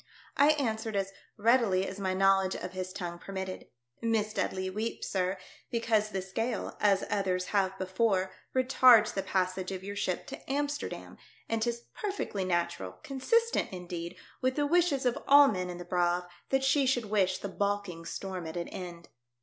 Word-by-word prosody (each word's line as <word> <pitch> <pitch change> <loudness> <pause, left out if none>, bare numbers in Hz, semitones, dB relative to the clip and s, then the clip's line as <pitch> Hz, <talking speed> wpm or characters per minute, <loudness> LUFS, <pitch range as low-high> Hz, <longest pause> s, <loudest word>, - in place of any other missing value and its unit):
I 290 +2 +6
answered 220 -6 -2
as 195 0 -1 0.2
readily 215 -4 +3
as 195 - -6
my 190 -1 -1
knowledge 195 0 +3
of 180 - -5
his 185 0 -4
tongue 175 -2 -5
permitted, 190 -1 -6 0.2
" 120 - -42
Miss 220 -2 0
Dudley 190 -3 -1
weeps, 215 +5 -3
sir, 185 0 0 0.3
because 225 -2 +1
this 190 -2 -5
gale, 225 +3 -2
as 200 -2 +3
others 185 -3 0
have 190 -1 +2
before, 190 0 +1 0.2
retards 255 -4 +6
the 195 - -1
passage 185 0 -1
of 190 -1 -5
your 200 +1 -5
ship 185 -3 -1
to 275 -1 -8
Amsterdam; 290 +1 -3 0.3
and 225 -1 -1
'tis 235 +1 -1
perfectly 395 - -3
natural, 170 - -1
consistent, 460 - +1
indeed, 175 -1 -6 0.3
with 255 0 +1
the 290 - +1
wishes 320 -4 +2
of 250 +3 +1
all 285 0 +9
men 185 -6 -1
in 175 - -5
the 175 - -8
Braave, 175 0 +1 0.3
that 270 0 +2
she 270 0 +3
should 245 -3 +1
wish 195 -3 +2
the - - -5
baulking 200 -3 -2
storm 185 -1 -5
at 160 - -6
an 170 - -3
end." 175 -2 -8
195 Hz, 175 wpm, -30 LUFS, 185-235 Hz, 0.3 s, all